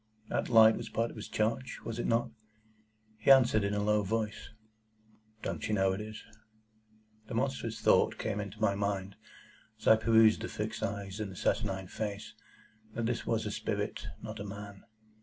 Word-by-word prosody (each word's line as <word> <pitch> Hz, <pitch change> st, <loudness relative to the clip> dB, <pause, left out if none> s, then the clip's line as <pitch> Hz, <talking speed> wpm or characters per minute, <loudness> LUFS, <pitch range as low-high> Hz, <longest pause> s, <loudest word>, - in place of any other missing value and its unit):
That -, -, -1 dB
light 110 Hz, -2 st, +7 dB
was -, -, -6 dB
part 115 Hz, +1 st, -1 dB
of -, -, -13 dB
his 110 Hz, -, -7 dB
charge? 115 Hz, +4 st, -1 dB
Was 115 Hz, +1 st, -4 dB
it -, -, -1 dB
not? 115 Hz, +1 st, +1 dB, 0.9 s
He 110 Hz, -, 0 dB
answered 120 Hz, -6 st, +6 dB
in 100 Hz, +1 st, 0 dB
a 105 Hz, -, 0 dB
low 105 Hz, 0 st, +3 dB
voice,—"Don't 110 Hz, 0 st, -6 dB
you 110 Hz, -, +1 dB
know 95 Hz, -1 st, +2 dB
it 95 Hz, -, -4 dB
is?" 110 Hz, 0 st, -8 dB, 1.0 s
The 115 Hz, -, -5 dB
monstrous 125 Hz, -2 st, -2 dB
thought -, -, +4 dB
came 110 Hz, -2 st, -2 dB
into 105 Hz, +1 st, -6 dB
my 110 Hz, -2 st, +3 dB
mind, 100 Hz, -1 st, -2 dB, 0.6 s
as -, -, -13 dB
I 110 Hz, -, +8 dB
perused 110 Hz, 0 st, +5 dB
the -, -, -3 dB
fixed -, -, -4 dB
eyes 100 Hz, 0 st, -4 dB
and 105 Hz, -2 st, -3 dB
the -, -, -10 dB
saturnine 95 Hz, -2 st, -1 dB
face, 100 Hz, +2 st, -5 dB, 0.6 s
that 115 Hz, -, -1 dB
this 120 Hz, +1 st, -2 dB
was 110 Hz, -1 st, 0 dB
a 105 Hz, -, -2 dB
spirit, -, -, -3 dB, 0.2 s
not 110 Hz, -1 st, -6 dB
a -, -, -4 dB
man. 100 Hz, 0 st, -9 dB
110 Hz, 175 wpm, -31 LUFS, 100-110 Hz, 1.0 s, I